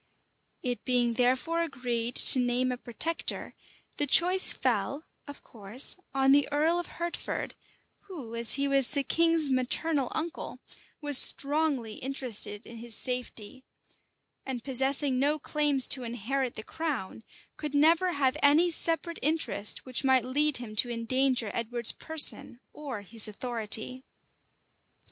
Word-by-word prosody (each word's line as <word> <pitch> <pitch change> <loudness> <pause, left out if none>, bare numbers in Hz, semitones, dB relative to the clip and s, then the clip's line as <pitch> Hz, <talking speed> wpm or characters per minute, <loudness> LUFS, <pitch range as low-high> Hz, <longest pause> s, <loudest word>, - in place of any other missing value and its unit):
It 245 -1 -4
being 245 -2 0
therefore 260 +7 0
agreed 245 -6 -4
to 260 - +7
name 250 +1 0
a 250 - -4
protector, 300 +8 -2 0.4
the 290 - +2
choice 365 +6 +5
fell, 255 +5 -2 0.2
of 285 - -11
course, 220 +3 -3 0.2
on 270 0 +2
the 285 +1 +2
earl 315 +4 +1
of 350 - -6
Hertford, 345 0 -5 0.5
who, 285 - -10
as 230 -1 +3
he 280 +1 -1
was 275 -2 +2
the 285 -1 -1
king's 330 +2 +1
maternal 265 +2 -1
uncle, 325 +1 -5 0.4
was 290 -3 +5
strongly 280 -6 +2
interested 245 -5 -5
in 230 - -12
his 230 0 -4
safety; 250 -1 -4 0.8
and 255 -3 -6
possessing 270 0 +1
no 290 +3 +1
claims 295 -3 +3
to 260 - +2
inherit 245 +2 -4
the 215 - -7
crown, 260 -9 -6 0.3
could 300 -2 -6
never 330 +5 +3
have 275 -2 0
any 310 +5 +3
separate 335 +1 -2
interest 305 -8 0
which 255 0 -3
might 260 -2 +2
lead 290 +2 +2
him 230 -3 -9
to 245 - +1
endanger 240 0 -1
Edward's 235 0 +1
person 310 -5 +3
or 270 -8 -7
his 220 +2 +1
authority. 230 +2 -2
265 Hz, 135 wpm, -27 LUFS, 240-295 Hz, 0.8 s, to